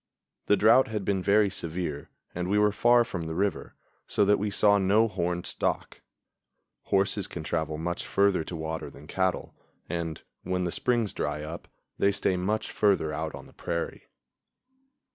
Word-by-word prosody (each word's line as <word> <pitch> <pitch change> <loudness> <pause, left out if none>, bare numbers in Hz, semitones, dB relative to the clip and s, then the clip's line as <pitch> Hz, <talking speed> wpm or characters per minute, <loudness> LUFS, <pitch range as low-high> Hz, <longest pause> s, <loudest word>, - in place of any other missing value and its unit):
The 105 - +4
drought 115 +5 +6
had 105 -3 -3
been 95 -2 +1
very 100 +1 +3
severe 80 -4 -4 0.2
and 90 +1 -3
we 105 - +2
were 105 0 +4
far 120 +3 +4
from 90 -8 -5
the 80 - -4
river, 100 +2 -1 0.3
so 105 - +2
that 105 0 +4
we 105 +1 -1
saw 100 0 +4
no 105 +4 +4
horned 90 -4 -2
stock. - - -2 0.8
Horses 100 0 +1
can 80 - -7
travel 80 -1 -2
much 85 +2 -3
further 100 -4 +2
to 90 - -6
water 80 0 -4
than 70 - -14
cattle, 95 +3 -1 0.3
and, 85 -2 -3 0.2
when 90 0 -1
the 90 - -1
springs 120 -1 0
dry 75 - -3
up, 80 +3 -7 0.3
they 100 - +4
stay 100 -2 0
much 105 +4 -1
further 100 -7 +2
out 80 +1 -3
on - - -10
the - - -17
prairie. 85 -1 -4
95 Hz, 170 wpm, -28 LUFS, 85-105 Hz, 0.8 s, drought